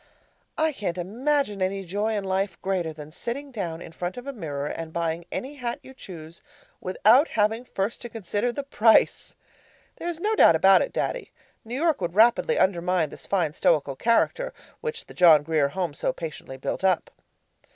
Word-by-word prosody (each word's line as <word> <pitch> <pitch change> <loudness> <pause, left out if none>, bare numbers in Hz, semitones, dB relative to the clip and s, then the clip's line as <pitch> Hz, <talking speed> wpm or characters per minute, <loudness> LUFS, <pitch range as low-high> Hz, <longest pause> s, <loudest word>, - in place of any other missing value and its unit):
I 315 0 +2
can't 195 - -4
imagine 220 +3 -1
any 190 +1 -1
joy 205 +5 -1
in 205 - -2
life 190 -1 -1
greater 185 -4 -1
than 155 -1 -10
sitting 265 - -5
down 175 -8 -4
in - - -10
front 175 +4 -5
of 245 - -7
a 280 - -5
mirror 145 - -4
and 160 +2 -5
buying 170 0 -2
any 280 +3 -5
hat 240 -3 -3
you 265 - -12
choose 170 -9 -11 0.4
without 225 - +4
having 220 +3 0
first 200 -1 -3
to 240 - -7
consider 225 +2 -2
the 285 +3 -4
price! 230 -5 +3 0.6
There's 340 -1 -4
no 425 +5 0
doubt 170 - +6
about 190 +4 +6
it, - - -2
Daddy; - - -3 0.3
New 230 +2 -6
York 315 - +1
would 175 0 -3
rapidly 240 - +4
undermine 180 -3 +1
this - - -11
fine 175 -6 0
stoical 145 -4 +1
character 240 - +1 0.2
which 465 -1 -5
the - - -13
John 160 -5 +6
Grier 155 -2 +2
Home 175 +1 -3
so - - -1
patiently 155 -5 -7
built 135 - -4
up. 185 -2 +1
195 Hz, 180 wpm, -25 LUFS, 170-245 Hz, 0.6 s, doubt